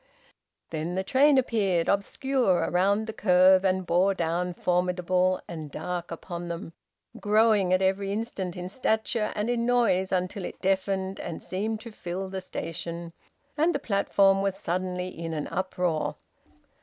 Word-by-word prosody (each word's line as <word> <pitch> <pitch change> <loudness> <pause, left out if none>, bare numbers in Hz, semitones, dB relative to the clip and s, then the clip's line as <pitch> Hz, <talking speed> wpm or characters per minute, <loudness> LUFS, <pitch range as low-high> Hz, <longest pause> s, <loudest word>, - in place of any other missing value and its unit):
Then 165 +2 -3
the 190 - 0
train 275 +7 +4
appeared, 200 -9 +1
obscure 200 0 +1
round 200 +4 +2
the 220 - -5
curve, 185 -2 +5
and 190 -1 +1
bore 185 +3 +3
down 175 +1 -1
formidable 180 +1 +1
and 160 -3 -7
dark 175 +3 -4
upon 175 +1 -6
them, 170 -1 -6 0.5
growing 210 -3 +3
at 185 +1 +3
every 195 +1 +1
instant 200 -4 -3
in 180 0 -5
stature 220 0 0
and 210 +1 -1
in 240 -1 0
noise 200 -7 +2
until 185 +1 -1
it - - -7
deafened 190 0 0
and 165 - -6
seemed 215 +4 -3
to 230 - -9
fill 190 -1 -5
the 190 0 -4
station; 170 -1 -6 0.4
and 320 +2 +2
the - - 0
platform 200 -4 +3
was 195 -1 -1
suddenly 180 +1 -2
in 165 -2 -5
an 150 - -3
uproar. 180 -4 -1
190 Hz, 150 wpm, -27 LUFS, 180-205 Hz, 0.5 s, curve